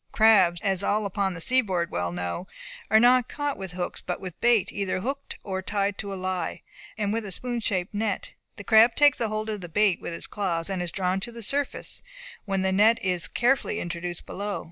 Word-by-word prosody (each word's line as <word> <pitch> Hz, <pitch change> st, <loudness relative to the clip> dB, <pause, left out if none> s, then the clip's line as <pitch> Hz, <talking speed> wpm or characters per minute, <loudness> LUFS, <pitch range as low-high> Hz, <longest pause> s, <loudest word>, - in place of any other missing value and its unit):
Crabs, 195 Hz, -6 st, +5 dB
as 195 Hz, -2 st, +2 dB
all 210 Hz, +1 st, +1 dB
upon 195 Hz, -1 st, -1 dB
the -, -, -6 dB
seaboard 190 Hz, -8 st, +3 dB
well 90 Hz, 0 st, -2 dB
know, 90 Hz, -, -4 dB, 0.4 s
are 220 Hz, +1 st, +6 dB
not 245 Hz, +1 st, +5 dB
caught 290 Hz, -1 st, -2 dB
with 190 Hz, -2 st, -7 dB
hooks, 180 Hz, 0 st, -4 dB
but 180 Hz, -, -4 dB
with 185 Hz, -3 st, -8 dB
bait 235 Hz, -4 st, +3 dB
either 195 Hz, -2 st, -2 dB
hooked 275 Hz, +5 st, -4 dB
or 190 Hz, -1 st, -3 dB
tied 200 Hz, +1 st, -1 dB
to 200 Hz, -2 st, -4 dB
a -, -, -4 dB
lie, 185 Hz, -2 st, -3 dB, 0.3 s
and 210 Hz, -1 st, -1 dB
with 225 Hz, 0 st, -1 dB
a 200 Hz, -, -6 dB
spoon 240 Hz, +4 st, -2 dB
shaped 190 Hz, -4 st, -2 dB
net. 205 Hz, -1 st, -2 dB, 0.2 s
The 205 Hz, -, -9 dB
crab 225 Hz, +2 st, +6 dB
takes 290 Hz, -2 st, +5 dB
hold 215 Hz, -2 st, -2 dB
of 210 Hz, -2 st, -3 dB
the 175 Hz, -, -8 dB
bait 205 Hz, +1 st, +2 dB
with -, -, -5 dB
its -, -, -7 dB
claws, 185 Hz, -3 st, -2 dB
and 185 Hz, -2 st, -2 dB
is 175 Hz, -2 st, -1 dB
drawn 185 Hz, 0 st, -1 dB
to 235 Hz, +5 st, -5 dB
the 230 Hz, -1 st, -9 dB
surface, 280 Hz, +6 st, -2 dB, 0.4 s
when 195 Hz, -2 st, -1 dB
the 190 Hz, -, +1 dB
net 215 Hz, +4 st, +5 dB
is 180 Hz, -3 st, +2 dB
carefully 245 Hz, -3 st, +1 dB
introduced 175 Hz, 0 st, -5 dB
below. 205 Hz, +1 st, -4 dB
200 Hz, 210 wpm, -26 LUFS, 185-220 Hz, 0.4 s, are